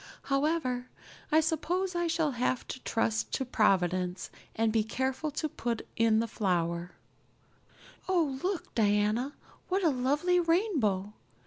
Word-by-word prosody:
"However, 275 -3 0 0.4
I 315 +1 +6
suppose 350 +4 -1
I 345 0 0
shall 325 -2 +1
just 245 - -8
have 250 0 0
to - - -5
trust 225 -2 -1
to 265 - 0
Providence 185 -5 +1 0.2
and 225 -1 +1
be 220 -1 +3
careful 260 +6 -2
to 300 +2 -2
put 235 -5 -3
in 225 -1 +3
the 230 - 0
flour. 175 -4 -1 1.2
Oh, 315 -8 +1
look, 375 -1 -3
Diana, 215 +5 +2 0.4
what 380 +1 +1
a 330 - +5
lovely 290 +8 +2
rainbow! 305 - +1
255 Hz, 135 wpm, -30 LUFS, 215-320 Hz, 1.2 s, I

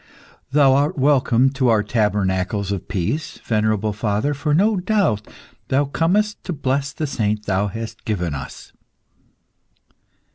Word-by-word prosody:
"Thou 140 -2 +5
art 145 +5 +1
welcome 130 -2 +3
to 130 -2 +1
our 110 -2 +3
tabernacles 100 -2 0
of 100 -3 -4
peace, 100 - -3
venerable 110 -1 0
father, 105 +6 -1
for 145 +2 -2
no 200 +7 +3
doubt, 180 - 0 0.4
thou 140 +2 +2
comest 195 +9 0
to 180 - -3
bless 140 -1 -1
the 155 - -3
saint 105 -6 -1
thou 95 +1 +1
hast 115 +3 -7
given 90 -7 -2
us. 70 -2 -8
120 Hz, 135 wpm, -21 LUFS, 105-145 Hz, 0.4 s, Thou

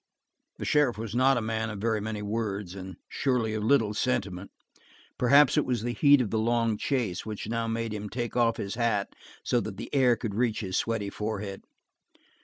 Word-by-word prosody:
The - - -5
sheriff 145 -7 +2
was 110 -1 -5
not 130 +2 +4
a - - 0
man 110 0 -2
of 105 - -5
very 110 0 0
many 105 0 -4
words, 105 -3 -3
and 95 -2 -8
surely 125 -5 0
of 110 -1 -2
little 110 -3 +3
sentiment; 100 -5 -2 0.7
perhaps 140 +4 +5
it - - +2
was 120 -4 -1
the 120 0 -1
heat 145 +1 +5
of 110 - -2
the 110 - +1
long 115 0 +1
chase 110 -6 -1
which 105 -2 -6
now 115 0 -1
made 115 -1 -2
him 105 0 -5
take 120 +1 -4
off 115 -2 +2
his 100 - -4
hat 115 -4 0 0.3
so 120 - +2
that 105 -4 -6
the - - -8
air 130 -4 +4
could 115 -3 -4
reach 115 +1 0
his 95 -3 -4
sweaty 110 -3 -1
forehead. 105 -2 -4
110 Hz, 200 wpm, -28 LUFS, 105-120 Hz, 0.7 s, perhaps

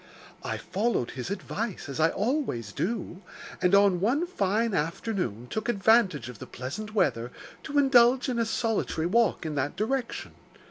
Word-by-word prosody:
I - - -3
followed 205 - -1
his 130 +5 -5
advice, 200 +1 -4
as 140 +2 -6
I 160 +1 +5
always 205 - -1
do, 195 -3 -3 0.4
and, 180 +1 +4
on 200 -3 +5
one 255 - +1
fine 220 - 0
afternoon, 165 - -2
took 220 - -3
advantage 205 - +3
of 125 -4 -9
the - - -8
pleasant 195 - -6
weather 120 - +1 0.3
to 290 -1 -4
indulge 255 -2 +5
in 245 -2 -1
a 230 - +2
solitary 225 -7 -1
walk 210 -1 +2
in 155 - -3
that 145 0 -2
direction. 245 +3 -2
205 Hz, 155 wpm, -27 LUFS, 160-235 Hz, 0.4 s, I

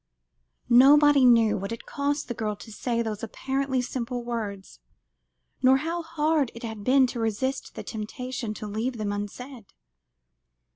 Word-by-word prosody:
Nobody 280 +3 +6
knew 230 -4 +5
what 195 +2 -5
it 230 - -6
cost 285 +1 -2
the 240 - -3
girl 215 -2 -3
to 220 - -12
say 235 +2 -1
those 215 -2 -4
apparently 265 +3 -2
simple 245 -1 -4
words, 215 -5 -5 0.8
nor 260 +1 +6
how 330 +5 -3
hard 310 -4 0
it 235 - -10
had 220 -3 -6
been 260 +3 +5
to 245 -1 -4
resist 230 +4 -2
the - - -6
temptation 230 +1 -5
to 215 - -7
leave 225 +4 -3
them 210 -2 -2
unsaid. 220 +4 -6
245 Hz, 150 wpm, -26 LUFS, 220-270 Hz, 0.8 s, Nobody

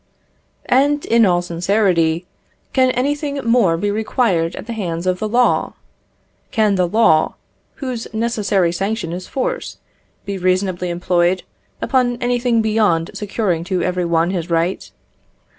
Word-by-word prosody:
And, 285 +3 +2
in 230 -2 +4
all 175 -1 +2
sincerity, 175 -1 +1 0.5
can 260 -1 +4
anything 285 +3 -1
more 230 -8 +3
be 205 +4 -1
required 205 -6 0
at - - -8
the 235 - -5
hands 175 -5 -3
of 185 0 0
the 215 - -2
law? 245 +3 +2 0.7
Can 215 -4 +2
the 180 -2 +1
law, 170 -5 +3 0.4
whose 255 -5 -5
necessary 210 -5 0
sanction 195 -1 -2
is 185 +1 -6
force, - - -3 0.5
be 200 -1 -4
reasonably 185 0 0
employed 175 +1 +1 0.4
upon 250 -3 +1
anything 245 -2 +1
beyond 210 -7 +1
securing 200 -5 -2
to 185 -1 -1
every 180 -1 -1
one 170 +1 +1
his 175 -2 -3
right? 170 +2 -1
200 Hz, 135 wpm, -19 LUFS, 175-235 Hz, 0.7 s, in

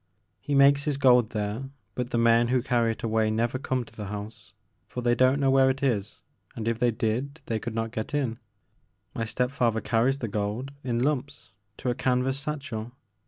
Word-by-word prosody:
He 140 +8 -2
makes 140 +1 +5
his 145 -3 0
gold 125 -4 +5
there 110 +5 -3 0.2
but 125 +1 -3
the 120 - -1
men 115 0 +4
who 125 0 +1
carry 120 -3 +2
it - - -13
away 110 -1 +1
never 115 +4 0
come 130 -2 -1
to 115 - -17
the 105 -2 -6
house, 105 0 -7 0.4
for 125 - -5
they 120 0 +3
don't 130 +3 +3
know 135 -1 +3
where 135 0 +5
it 135 +1 -2
is 105 -6 -1 0.3
and 115 -1 -4
if 115 -1 0
they 125 - +3
did 120 +6 -2
they 110 -1 -1
could 115 +1 -5
not 115 0 -2
get 110 +2 -4
in. 130 -6 -1 0.7
My 115 - -2
step 125 +3 -1
father 120 -5 +1
carries 115 +5 +1
the 120 - -3
gold 105 +6 -3
in 120 -2 -1
lumps 145 0 -2 0.3
to 125 - -1
a - - +1
canvas 130 +2 0
satchel. 135 -6 -5
120 Hz, 205 wpm, -27 LUFS, 110-135 Hz, 0.7 s, makes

